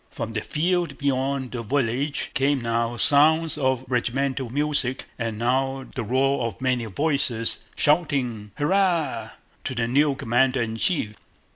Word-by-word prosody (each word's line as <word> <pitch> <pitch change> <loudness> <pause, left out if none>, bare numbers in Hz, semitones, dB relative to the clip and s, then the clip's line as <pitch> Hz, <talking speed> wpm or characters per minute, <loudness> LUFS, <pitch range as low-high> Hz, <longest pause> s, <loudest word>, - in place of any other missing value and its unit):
From 115 - -5
the 110 -1 -2
field 170 +2 -1
beyond 135 -1 -1
the 120 - -4
village 135 +3 -1
came 140 +1 +2
now 115 0 -1
sounds 155 +5 +4
of 130 -3 0
regimental 130 +1 -1
music 140 -1 0
and 115 -2 -3
now 135 +3 0
the 125 - -3
roar 130 +2 +1
of 110 - -8
many 125 -2 0
voices 125 - +1 0.2
shouting 140 -9 +1
"Hurrah!" 155 - +1 0.3
to 130 - -4
the 115 -1 0
new 140 +3 +2
commander 130 0 +1
in 115 -1 -2
chief. 115 - 0
130 Hz, 140 wpm, -24 LUFS, 120-145 Hz, 0.3 s, sounds